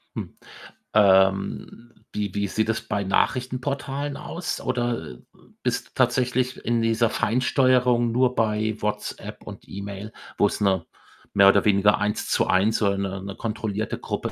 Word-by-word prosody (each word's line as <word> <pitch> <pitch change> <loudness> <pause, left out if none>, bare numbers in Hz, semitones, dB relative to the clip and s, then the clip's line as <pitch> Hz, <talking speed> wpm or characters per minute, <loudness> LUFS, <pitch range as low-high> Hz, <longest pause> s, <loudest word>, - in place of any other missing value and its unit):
Hm. - - -6 0.6
Ähm, 95 +3 +2 0.2
wie 105 -3 -3
wie 100 0 -1
sieht 110 +3 -1
das 115 - 0
bei 100 0 -2
Nachrichtenportalen 135 +6 -1
aus? 175 +2 -5
Oder 120 - -2 0.5
bist - - -1
du - - -29
tatsächlich 125 0 +1
in 120 -1 +1
dieser 115 0 +2
Feinsteuerung 125 0 +2
nur 125 +1 +2
bei 110 -1 0
WhatsApp 105 0 -4
und - - -11
E-Mail, 100 +2 -7 0.3
wo 105 - +4
es 100 - -4
nur 95 -2 +1 0.5
mehr 100 -1 +6
oder 100 0 +3
weniger 105 0 +4
Eins-zu-eins 105 0 +1
so 105 - +1
eine 100 -1 -2
'ne 100 -1 -6
kontrollierte 110 -1 -3
Gruppe - - -4
110 Hz, 140 wpm, -24 LUFS, 100-125 Hz, 0.6 s, mehr